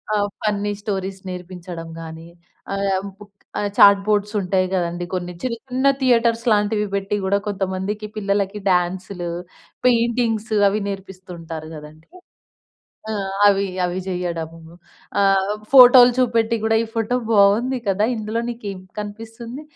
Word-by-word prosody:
ఆహ్, 205 0 +1 0.2
funny 205 0 0
stories 195 -2 -3
నేర్పించడం 180 -2 -8
గానీ, 165 +1 -9 0.5
ఆహ్, 195 -1 0 0.2
బుక్ 205 -1 -15 0.3
ఆహ్, 205 -1 -2
చాట్‌బోడ్సుంటాయి 200 -2 +4
గదండీ, 175 -1 -2
కొన్ని 180 0 -4
చిన్న 255 +2 -3 0.2
థియేటర్స్ 235 -2 +2
లాంటివి 210 0 +1
పెట్టి 195 +1 -2
కూడా 200 +1 +3
కొంతమందికి 195 +1 -3
పిల్లలకి 200 0 -1
డ్యాన్సులు, 180 0 -1 0.6
పెయింటింగ్సు 230 -2 +1
అవి 210 +2 -1
నేర్పిస్తుంటారు 180 -5 -8
గదండీ. 155 +2 -14 1.0
ఆ! - - -1 0.4
అవి 200 0 +2 0.2
అవి 180 +1 -2
జెయ్యడము. 170 -3 -4 0.6
ఆహ్, 195 0 +3 0.2
ఫోటోలు 250 -1 +9
చూపెట్టి 230 -2 +2
గూడా, 220 0 +3
ఈ - - -2
ఫోటో 230 +2 0 0.2
బావుంది 220 +6 +4
కదా! 200 +2 +2
ఇందులో 220 +2 -2
నీకేం 205 -5 -6 0.2
కనిపిస్తుంది, 225 +5 -7
200 Hz, 115 wpm, -21 LUFS, 185-225 Hz, 1.0 s, ఫోటోలు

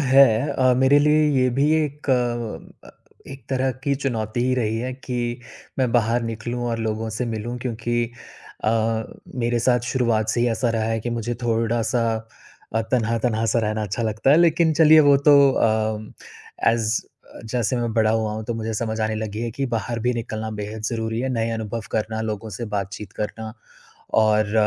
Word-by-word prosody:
है। 135 0 +7 0.3
अ, 130 -2 +3
मेरे 130 +2 +5
लिए 150 +1 +4
ये 130 - +3
भी 140 +5 +2
एक 145 -1 -5
अ, 120 -3 -2 0.4
एक 135 -3 -10
तरह 130 0 +1
की 140 -1 +2
चुनौती 120 -5 -2
ही 130 +1 +1
रही 110 -3 0
है 125 +2 -3
कि 120 -2 -4 0.4
मैं 130 -2 +2
बाहर 120 0 +2
निकलूँ 115 +2 -4
और 115 - -2
लोगों 110 0 -2
से 125 - -1
मिलूँ 115 +2 -4
क्योंकि 120 -1 -1 0.6
अ, 110 0 +1 0.4
मेरे 120 0 +1
साथ 120 +1 +2
शुरुआत 115 -4 +1
से 115 +2 0
ही 120 - +3
ऐसा 120 +1 0
रहा 115 -1 0
है 115 0 -1
कि 120 - -4
मुझे 120 0 -2
थोड़ा-सा 115 +1 0 0.7
अ, 110 - +2
तन्हा-तन्हा 115 -2 +1
सा - - +2
रहना 110 -1 -1
अच्छा 105 +3 -3
लगता 110 +4 +1
है। 145 - +7
लेकिन 170 -1 +4
चलिए, 155 0 +7
वो 145 -2 +6
तो 145 +1 +5 0.3
अम, 110 -1 -1 0.6
एज़ 115 -1 +1 0.3
अ, - - -10
जैसे 120 +1 -1
मैं 120 -1 -1
बड़ा 110 -2 +3
हुआ 110 -1 0
हूँ 110 0 -5
तो 115 - -3
मुझे 115 0 -3
समझ 110 0 -2
आने 110 0 0
लगी 110 0 -4
है 120 - -2
कि 135 +4 -3
बाहर 115 +1 -3
भी 125 - +2
निकलना 110 -2 -4
बेहद 105 +1 -6
ज़रूरी 110 0 -2
है। 130 - -1
नए 115 -1 -1
अनुभव 115 0 -3
करना, 110 0 -2
लोगों 110 0 -4
से 105 +4 -5
बातचीत 100 +1 -5
करना 110 +1 -5 0.7
और 110 -1 +2
115 Hz, 185 wpm, -23 LUFS, 110-125 Hz, 0.7 s, है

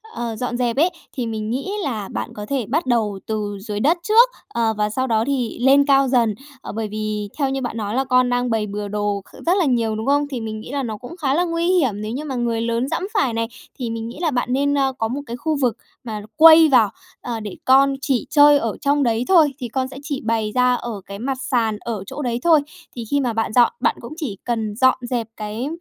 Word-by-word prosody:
ờ, 235 -1 -3
dọn 245 +2 -3
dẹp 240 -2 0
ấy, 330 +5 +4 0.2
thì 250 - -3
mình 215 -1 -4
nghĩ 270 - -3
là 220 - -3
bạn - - -4
có 210 - -7
thể 270 -5 -1
bắt 300 +5 0
đầu 220 -5 0
từ 210 -2 -3
dưới 205 0 -4
đất 310 +10 +3
trước, 455 +6 +6 0.2
ờ, 230 -1 0
và 210 0 +1
sau 260 +4 -1
đó 220 -2 +2
thì 255 -5 -2
lên 275 +2 +5
cao 275 -1 +4
dần. 235 -5 +2 0.3
Ờ, - - -7
bởi 220 0 -3
vì 210 -1 -3
theo 280 -3 +1
như 270 0 -2
bạn 245 -2 -4
nói 210 0 -3
là 265 - +2
con 255 -1 +3
đang 245 0 0
bày 220 -2 0
bừa 205 0 -4
đồ 205 0 -2
kh - - -15
rất 355 +3 +3
là 365 - +2
nhiều, 230 -5 +1
đúng 220 +1 -4
không? 285 +1 +2
Thì 260 -4 -5
mình 220 -1 -5
nghĩ 220 - -9
là 280 -1 -2
nó 220 -3 -4
cũng 250 - -10
khá 280 -6 0
là 340 +5 +2
nguy 335 0 -1
hiểm 270 - +2
nếu 215 +1 -4
như 270 +6 -4
mà 280 -4 -4
người 235 -2 -1
lớn 235 +2 -1
giẫm - - -2
phải 380 - +1
này. 230 0 -1 0.3
Thì 245 -3 -3
mình 225 0 -4
nghĩ 235 - -9
là 330 -3 +1
bạn 250 -1 -1
nên, 285 +2 +1
ơ, 270 -1 +1
có 225 - 0
một 260 +5 -4
cái 235 - -5
khu 310 +4 -1
vực 240 -3 +1 0.3
mà 215 -3 -5
quây 320 0 +8
vào, 240 -6 +5 0.3
ờ, 235 -2 -4
để 210 -3 -7
con 275 +1 +5
chỉ 270 -3 0
chơi 290 -1 +7
ở 230 -6 -2
trong 285 0 +2
đấy 230 -1 +1
thôi, 320 -7 +5
thì 250 - -4
con 260 +3 -2
sẽ 265 - -10
chỉ 285 -2 -4
bày 220 -2 0
ra 250 0 +4
ở 235 -4 -5
cái 200 0 -8
mặt 265 +3 -2
sàn 230 -5 0
ở 220 -4 -4
chỗ 295 - -6
đấy 240 -3 -1
thôi, 325 -3 +5 0.3
thì 240 - -5
khi 285 - +3
mà 250 -4 0
bạn 225 0 -1
dọn, 240 0 +5
bạn - - +1
cũng - - -8
chỉ 265 - -4
cần 225 -3 -2
dọn 260 +3 +4
dẹp 245 -2 -2
cái, 215 +4 -4
245 Hz, 260 wpm, -21 LUFS, 220-275 Hz, 0.3 s, quây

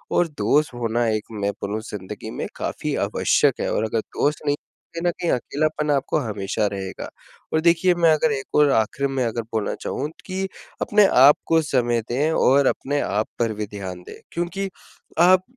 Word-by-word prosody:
और 175 - +3
दोस्त 145 +1 +1
होना 120 0 0
एक 110 -1 0 0.2
मैं 100 0 +1
बोलूँ 105 +2 -2
ज़िंदगी 95 -3 -7
में - - -3
काफ़ी - - -3
आवश्यक - - +2
है, - - -1
और 110 - 0
अगर 110 +1 -1
दोस्त 150 +7 -2
नहीं, 145 - +2
तो 165 +3 -13
कहीं 175 - 0
न - - +1
कहीं 175 -2 0
अकेलापन 150 +4 0
आपको 140 +1 +1
हमेशा 105 -4 -1
रहेगा। 95 -1 -5 0.4
और 160 - +3
देखिए, 175 +2 +4
मैं 165 -2 +4
अगर 155 0 +2
एक 135 -1 -5
और 150 -1 +5
आखिर 125 +5 +1
में 135 -2 -1
अगर 115 0 -2
बोलना 110 -2 -1
चाहूँ 145 - -2
त - - -17
कि 190 0 -2 0.3
अपने 210 -1 +4 0.2
आप 145 +2 +9
को 165 0 +4
समय 120 -5 +1
दें 145 +6 +1
और 140 +2 +4
अपने 145 +1 0
आप 105 +2 -1
पर 115 -2 +1
भी 105 0 -3
ध्यान 95 -3 -7
दें, - - -10 0.2
क्योंकि 175 +3 -3 0.5
आप 180 +2 +6
140 Hz, 195 wpm, -23 LUFS, 110-160 Hz, 0.5 s, आप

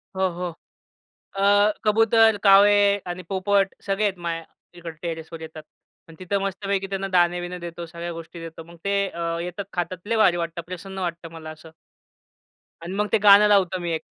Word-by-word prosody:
हो, 190 0 +1
हो. 175 +1 -4 0.9
अ, 205 +1 +4
कबूतर, 225 0 +4
कावळे 200 0 +6
आणि 180 +1 -5
पोपट 195 0 +1
सगळे 195 +2 -1
आहेत 195 -3 0
माझ्या 165 -1 -4 0.3
इकड 165 -2 -8
टेरेसवर 165 -1 -6
येतात. 160 -1 -9 0.4
पण 165 - -14
तिथं 195 +2 -1
मस्तपैकी 195 0 -2
त्यांना 195 0 -3
दाणे-बिणे 175 0 +1
देतो, 170 0 -7
सगळ्या 170 +1 -7
गोष्टी 165 +1 -9
देतो. 165 0 -9
मग 170 +1 -15
ते 200 0 +1
अ, 170 0 -3
येतात, 180 +3 -5
खातात 180 +2 -4
लय 230 0 0
भारी 180 -5 +4
वाटतं. 170 0 -4
प्रसन्न 190 +2 -7
वाटतं 170 -2 -5
मला 160 -1 -9
असं. 155 +1 -13 1.1
आणि 175 +3 -6
मग 210 +1 0
ते 225 - +4
गाणं 205 0 +7
लावतो 190 -3 +3
मी 170 -1 -3
एक. 160 - -2
180 Hz, 175 wpm, -23 LUFS, 170-200 Hz, 1.1 s, गाणं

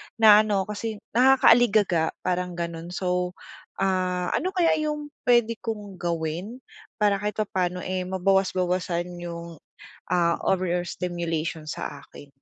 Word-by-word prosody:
naaano 215 -2 +6
kasi 210 +1 -5
nakaka-aligaga 230 -9 +4
parang 180 0 -1
ganun. 170 -1 -5
So, 180 0 -1 0.4
ah, 185 -2 0
ano 375 +2 -1
kaya 340 -3 +4 0.2
yung 300 -1 -4 0.2
puwede 235 -2 +3
kong 205 -4 -6
gawin 175 +8 -3 0.4
para 200 -1 +3
kahit 210 0 -3
papano, 180 -4 -1
eh, 185 0 -2
mabawas-bawasan 180 -2 0
yung, 170 -2 -7 0.5
ah, 170 -2 +3
overstimulation 175 -3 -2
sa 145 -1 -5
akin? 145 - -14
185 Hz, 110 wpm, -25 LUFS, 175-210 Hz, 0.5 s, naaano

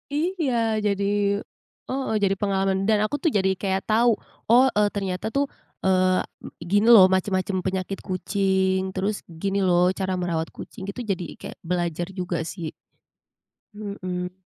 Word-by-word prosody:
Iya, 325 -3 0 0.3
jadi 200 -1 +1 0.9
heeh, 265 -3 -2
jadi 195 -1 +3
pengalaman 195 -1 +1
dan 215 - +5
aku 250 - -2
tuh 330 - +3
jadi 190 0 +2
kayak 190 -1 -1
tahu, 230 +1 +3 0.3
"Oh 245 +3 +7
e - - +5
ternyata 195 0 -3
tuh, 280 +4 +1 0.4
eee, 185 -1 +3 0.2
m - - -6
gini 205 +6 +1
loh 220 -6 +10
macam-macam 190 +1 0
penyakit 190 +1 -2
kucing, 190 0 0
terus 200 +2 -2
gini 195 +4 -2
loh 180 0 +3
cara 190 -1 -2
merawat 170 -2 -2
kucing," - - -10
gitu 245 - -5
jadi 195 -4 -1
kayak - - -9
belajar 175 -1 -2
juga 180 -3 -3
sih. 165 0 -5 1.0
Mhm. 185 -3 -5
190 Hz, 145 wpm, -24 LUFS, 185-205 Hz, 1.0 s, loh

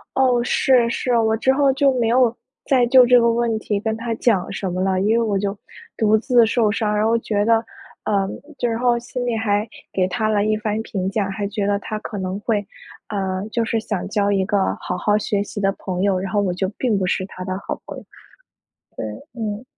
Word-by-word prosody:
哦， 250 -2 +3
是， 250 -1 +3
是， 240 +1 0
我 220 -1 +2
之 265 +4 +2
后 275 0 +3
就 270 0 +3
没 230 - +2
有 240 0 +3 0.3
再 255 -3 +3
就 255 0 +7
这 245 0 +6
个 235 0 +3
问 230 -1 0
题 210 -1 -2
跟 220 +1 -2
他 230 +1 -3
讲 215 -6 +1
什 190 -3 -3
么 185 +1 -2
了。 190 -1 +1
因 215 +3 +2
为 - - +2
我 205 -3 0
就 200 +1 -2 0.4
独 220 0 +3
自 240 0 +4
受 220 -1 +2
伤， 210 -1 0
然 210 +1 +1
后 230 +1 +3
觉 205 -2 -1
得， 230 +1 +5 0.5
呃 200 -2 +1 0.3
就 245 - 0
然 225 0 -2
后 245 -1 +3
心 245 +1 -5
里 240 -2 0
还 210 -1 0 0.3
给 185 -1 +1
他 215 +4 -1
了 205 -1 +2
一 215 0 +1
番 215 0 -2
评 190 -4 -3
价， 200 0 -1
还 200 +1 -3
觉 205 0 -2
得 205 0 +2
他 215 +1 -5
可 210 0 -7
能 190 0 -3
会， 210 -1 -1 0.4
呃， 190 -1 -2
就 235 0 0
是 225 0 0
想 210 -4 -3
交 205 -1 +1
一 195 -1 +2
个 200 0 +1
好 - - -3
好 210 +3 +2
学 205 -1 -1
习 205 - -7
的 195 0 +2
朋 185 -2 -4
友， 195 -2 +2
然 190 +1 -4
后 205 - +3
我 190 -3 0
就 185 +2 -1
并 235 -5 +1
不 190 - 0
是 185 - 0
他 185 -2 -8
的 185 - -3
好 - - -3
朋 - - -8
友。 - - -10 1.1
对， - - -9 0.2
嗯。 215 +1 -3
215 Hz, 250 characters per minute, -21 LUFS, 200-235 Hz, 1.1 s, 就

